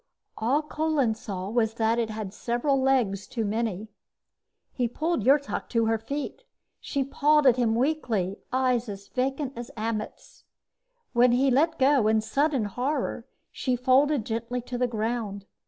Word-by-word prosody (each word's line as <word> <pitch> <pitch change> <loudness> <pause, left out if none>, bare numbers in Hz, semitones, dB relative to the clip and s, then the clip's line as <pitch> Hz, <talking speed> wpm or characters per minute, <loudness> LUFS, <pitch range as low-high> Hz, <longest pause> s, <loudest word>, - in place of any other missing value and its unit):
All 265 +7 +1
Kolin 300 -6 0
saw 195 -4 -6
was 225 -1 +1
that 230 +1 +1
it 230 -2 0
had 215 -3 -5
several 245 +5 0
legs 235 -8 +1
too 230 -3 -3
many. 215 -1 -2 0.9
He 245 -2 0
pulled 310 +1 -1
Yrtok 280 +2 +2
to 230 -1 +1
her 225 0 +1
feet. 285 - -5 0.4
She 280 -2 -2
pawed 295 +2 +3
at 255 -2 +6
him 230 -3 +2
weakly, 230 - 0
eyes 250 -2 +1
as 200 0 -8
vacant 270 +1 -2
as 240 0 -7
Ammet's. 215 0 -5 0.7
When 240 0 +5
he 265 +2 +3
let 320 +6 +2
go 265 -4 +4
in 220 0 +3
sudden 270 +3 0
horror, 250 +3 -2 0.2
she 255 -2 -1
folded 260 +1 +3
gently 230 +2 -3
to 245 +1 -5
the 250 - +2
ground. 220 -3 -3
245 Hz, 155 wpm, -26 LUFS, 220-275 Hz, 0.9 s, at